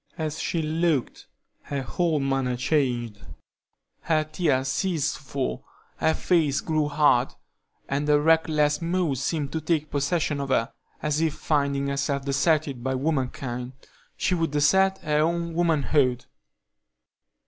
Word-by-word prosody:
As 155 -2 -3
she 165 -2 -1
looked 155 -3 -1 0.3
her 140 -2 -4
whole 165 +3 0
manner 135 -2 0
changed; 125 -6 0 0.8
her 155 -2 +1
tears 150 -4 0
ceased 155 0 0
to - - -16
fall, 130 - -4 0.3
her 160 - +2
face 155 -6 +2
grew 155 -2 0
hard, 145 -4 +2 0.5
and 145 +2 -1
a 145 0 +5
reckless 150 -1 +2
mood 170 -5 0
seemed 140 0 -2
to 160 - -2
take 155 -1 -1
possession 145 +1 0
of 140 -1 -3
her, 115 -3 +1 0.3
as 150 +1 0
if 160 -2 0
finding 140 -3 0
herself 140 0 -1
deserted 140 -2 +1
by 130 0 -1
womankind, 130 -3 -2 0.4
she - - 0
would 165 -2 0
desert 190 +7 +3
her 150 -1 +1
own 170 +1 0
womanhood. 145 -6 +1
150 Hz, 135 wpm, -25 LUFS, 135-160 Hz, 0.8 s, a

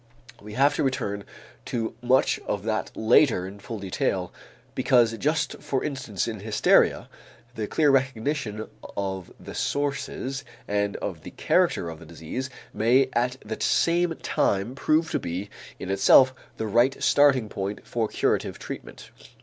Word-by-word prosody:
We 105 +1 -10
have 140 +5 +4
to - - +1
return 100 -7 -2 0.4
to 115 -2 -2
much 125 +2 +3
of 100 -1 -2
that 110 0 -1
later 110 -3 +4
in 100 +2 -10
full 110 +3 -6
detail 95 -2 -2 0.4
because 120 -3 +3
just 155 +2 0
for 135 - -1
instance 130 -9 -3
in 110 -2 -4
hysteria, 105 +1 +3 0.5
the 110 -3 -3
clear 150 +3 +3
recognition 130 -4 -1 0.3
of 95 -2 -3
the - - -9
sources 135 -1 -2 0.2
and 100 0 0
of - - -5
the - - -9
character - - +1
of 80 -1 -7
the - - -13
disease 85 +11 -5 0.2
may 125 +4 +3
at 125 +2 0
the 110 +1 -5
same 170 0 +2
time 100 +5 0
prove 155 +4 +1
to - - 0
be 95 +4 -5 0.3
in 95 - -5
itself 130 +7 +6 0.2
the 110 - -2
right 120 +5 +2
starting 135 -5 +4
point 100 0 -5
for 115 -2 -1
curative - - 0
treatment. - - -9
115 Hz, 150 wpm, -26 LUFS, 100-135 Hz, 0.5 s, itself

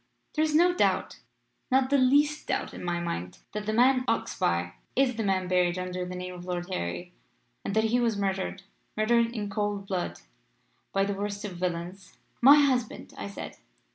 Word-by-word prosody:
There 310 - +2
is 310 -1 +1
no 350 +3 +5
doubt - - +1 0.5
not 260 +1 +3
the 280 - +5
least 290 +4 +3
doubt - - -1
in - - -8
my 175 -1 -1
mind 90 - -4
that 210 0 -5
the - - +1
man 255 +3 +4
Oxbye 85 - 0 0.2
is 260 -2 +3
the 225 - -2
man 190 -2 +1
buried 180 -1 +2
under 180 0 -3
the 180 - -6
name 180 0 -5
of 175 -1 -9
Lord 175 -1 -3
Harry, 85 - -4 0.5
and 195 - -3
that 220 - +4
he 230 +2 +2
was 230 -3 +1
murdered 195 -1 -2 0.3
murdered 230 +2 +3
in 215 -4 -3
cold 205 -1 -2
blood 185 -3 -3 0.7
by 195 - +2
that 200 0 -2
worst 205 +1 -4
of 185 -4 -6
villains 180 +1 -4
' - - -40
"'My 275 +4 +9
husband,' 255 -5 0
I - - -5
said. 200 - -8
200 Hz, 190 wpm, -28 LUFS, 180-240 Hz, 0.7 s, My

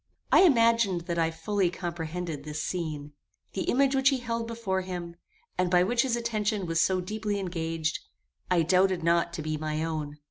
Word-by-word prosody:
I - - +7
imagined 230 - +4
that 170 0 -3
I 165 0 +2
fully 175 +3 0
comprehended 170 -3 -5
this 150 +1 -4
scene. 155 -5 -4 0.4
The 190 - -2
image 270 +1 +3
which 270 0 +4
he 270 - +1
held 230 -1 -3
before 225 -5 -2
him, 175 -2 -6 0.4
and 180 -1 +2
by 180 0 +5
which 235 +5 +2
his 255 -2 +1
attention 215 -4 -1
was 165 -1 +1
so 185 +1 +2
deeply 210 +2 -3
engaged, 165 -3 -2 0.5
I 175 -2 +3
doubted 185 +1 +2
not 170 0 +2
to 165 -3 -4
be 155 0 -2
my 155 0 -2
own. 155 -2 -4
180 Hz, 180 wpm, -28 LUFS, 165-215 Hz, 0.5 s, I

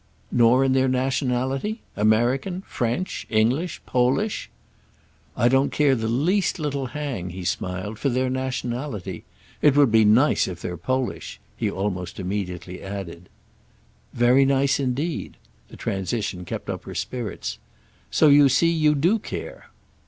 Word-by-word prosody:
"Nor 120 +2 +5
in 130 - +2
their 130 0 +3
nationality?—American, 130 - 0
French, 125 +10 -3
English, 125 +11 +1
Polish?" 130 - 0 0.9
"I 120 - +4
don't 135 +2 +3
care 145 -2 +3
the 110 -3 -1
least 165 - +1
little 140 -4 -2
'hang,'" 135 - -4
he 90 +1 -7
smiled, 95 +4 -3
"for 140 - +1
their 130 +1 0
nationality. 125 - -4 0.4
It 145 -1 +4
would 140 -5 +5
be 110 0 +5
nice 115 +8 +4
if 90 -2 -6
they're 90 0 -4
Polish!" 130 +9 -3 0.2
he - - -1
almost 95 -2 -3
immediately 90 -2 -4
added. 95 -3 -7 0.8
"Very 125 +3 +4
nice 135 0 +2
indeed." 140 +5 -2 0.3
The - - -12
transition 95 -1 -3
kept - - -6
up - - -5
her - - -8
spirits. 120 -6 -4 0.5
"So 155 - +4
you 145 -1 +7
see 165 +6 +3
you 155 -2 +3
do 175 +10 +2
care." - - -7
125 Hz, 135 wpm, -24 LUFS, 105-140 Hz, 0.9 s, you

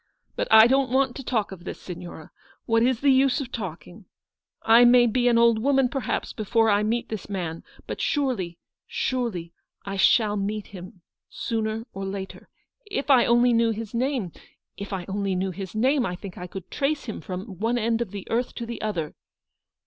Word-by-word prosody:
But - - -1
I 220 0 +9
don't 265 +1 +3
want 260 0 +1
to 270 - -7
talk 225 -6 -1
of 180 -3 -10
this, - - -7
Signora: 175 -3 -9 0.3
what 225 0 +2
is 250 0 +2
the 280 -1 +5
use 265 +1 +3
of 260 -4 -5
talking? 185 -1 -7 0.6
I 230 +2 +7
may 245 0 +7
be 245 +2 +1
an 235 -1 +4
old 235 -1 +4
woman, 270 +1 +2
perhaps, 265 -3 -3
before 220 +1 +2
I 205 0 +3
meet 230 +3 -1
this 215 -3 -6
man; 170 -5 -4 0.2
but - - -5
surely, 255 - -1 0.3
surely 225 -10 -2 0.3
I 195 0 -4
shall 210 +1 +4
meet 205 +1 -3
him 180 -1 -11 0.3
sooner 220 -1 -3
or 195 - -5
later. 195 0 -6 0.4
If 295 -8 -1
I 255 -3 +6
only 240 +1 +4
knew 230 0 +3
his 225 0 -4
name 245 - -1 0.2
— - - -54
if 200 +1 -7
I 185 -3 -4
only 195 -1 -1
knew 190 +1 -1
his 190 +1 -7
name, 260 +4 +2
I 180 -5 -2
think 190 0 -9
I 180 - -7
could 185 0 -9
trace 285 +1 -1
him 220 - -6
from 185 0 -7
one 230 +3 +1
end 230 0 0
of 235 - -2
the 200 0 -7
earth 240 +2 -1
to 235 - -5
the 235 0 -6
other. 175 -8 -3
220 Hz, 195 wpm, -25 LUFS, 195-245 Hz, 0.6 s, I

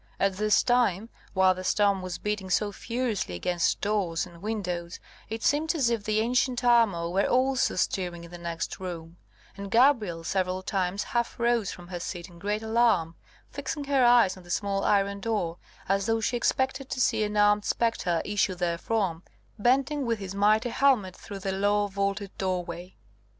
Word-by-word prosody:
At 195 -1 +1
this 210 0 +3
time, 230 -4 +1 0.3
while 190 0 +5
the 185 0 -7
storm 200 0 +2
was 185 -1 -5
beating 210 -2 -3
so 205 +3 +1
furiously 230 - -3
against 175 - 0
doors 200 -6 0
and 170 -2 -14
windows, 180 -5 -4 0.3
it 225 +1 -5
seemed 315 +4 +2
as 260 -7 +2
if 230 -3 -1
the 215 0 +1
ancient 245 +2 +1
armour 225 -9 +3
were 190 +3 +1
also 260 +1 +2
stirring 180 -2 -1
in 170 - -12
the 175 - -9
next 170 0 -4
room, 170 -2 -7 0.4
and 200 0 -7
Gabrielle 225 -8 +3
several 185 +1 -1
times 190 0 -1
half 235 0 -2
rose 235 -3 +1
from 175 -1 -11
her 175 -1 -5
seat 175 0 -6
in 170 -1 -15
great 210 +3 -2
alarm, 220 -7 +2 0.4
fixing 295 - -4
her 275 -2 +2
eyes 240 -6 +5
on 185 - -13
the 175 - -17
small 195 +2 -1
iron 200 0 +2
door, 200 -6 -2 0.3
as 195 +2 +1
though 225 0 +2
she 225 +2 -1
expected 265 +2 0
to - - -3
see 220 - +2
an 210 0 -2
armed 205 0 +4
spectre 195 -9 0
issue 205 -2 0
therefrom, 175 +1 -1 0.4
bending 270 +5 +2
with 230 -1 +1
his 195 -2 -6
mighty 215 +4 +3
helmet 235 -8 +2
through 200 - -9
the 195 0 -3
low 205 +2 +1
vaulted 200 0 -3
doorway. 180 -1 -3
200 Hz, 175 wpm, -27 LUFS, 180-230 Hz, 0.4 s, while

